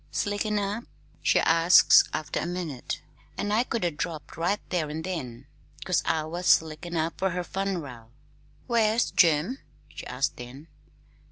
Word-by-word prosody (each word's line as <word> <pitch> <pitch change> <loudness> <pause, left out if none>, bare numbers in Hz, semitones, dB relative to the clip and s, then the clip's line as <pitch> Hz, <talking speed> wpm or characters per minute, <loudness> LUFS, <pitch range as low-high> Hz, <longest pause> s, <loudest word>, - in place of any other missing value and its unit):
'Slickin' 205 +1 -1
up?' 205 +3 -2 0.4
she - - +3
asks 165 +2 +6
after 155 - -3
a - - -3
minute; 170 -8 -5 0.3
an' 205 - -2
I 220 +3 +3
could 230 -6 -2
'a' 175 - +1
dropped 155 0 -5
right 175 +6 0
there 165 -5 0
an' 155 +2 -5
then, 135 -9 -5 0.4
'cause 185 - +2
I 160 -1 +1
was 175 +3 -4
slickin' 160 +2 +2
up, 160 +1 -2
fer 190 - +1
her 180 0 -3
fun'ral. 165 -13 -4 0.6
'Where's 230 -1 +2
Jim?' 170 - +3 0.3
she - - -9
asks 125 +2 -1
then. 130 +6 -11
170 Hz, 155 wpm, -27 LUFS, 155-195 Hz, 0.6 s, asks